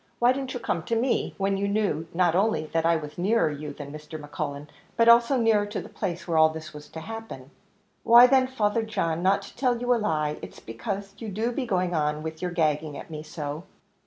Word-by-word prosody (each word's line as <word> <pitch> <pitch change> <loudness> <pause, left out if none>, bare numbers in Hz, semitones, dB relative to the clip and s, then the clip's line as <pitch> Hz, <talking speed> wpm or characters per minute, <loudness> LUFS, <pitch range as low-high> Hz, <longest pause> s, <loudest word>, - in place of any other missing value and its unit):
why 245 +1 +4
didn't 265 -1 -4
you - - -2
come 170 -7 -1
to 230 - -2
me, 240 +3 +1
eh - - -11
when 195 0 0
you 200 +1 -1
knew, 200 -6 0
not 175 -1 +2
only 185 -4 +1
that 165 0 +2
I 170 - +4
was 150 0 -6
nearer 195 -3 +2
you 150 0 -6
than 145 0 -9
Mr. 150 +1 -8
Cullen, 145 -1 -4 0.3
but 230 0 +4
also 235 +3 +6
nearer 220 -3 +3
to 205 - -4
the - - -9
place 180 -4 -4
where 165 -2 +2
all 160 0 +7
this 160 0 -8
was 150 0 -10
to 160 - -8
happen?" 195 -10 -8 0.5
"Why 235 +1 +8
then, 260 0 +4
Father 225 -4 0
John, 190 -7 -1
not 190 +2 +2
to - - -12
tell 250 -3 +1
you 245 +1 +2
a - - +2
lie, 155 -8 -1
it - - -8
is - - -14
because 195 - -5
you 225 - -5
do 220 +5 -1
be 250 +1 -3
going 185 -3 0
on 150 -1 0
with 160 0 -6
your 180 - -1
gagging 155 -3 0
at - - -10
me 155 -1 -5
so." 150 +1 -6
180 Hz, 240 wpm, -26 LUFS, 155-225 Hz, 0.5 s, Why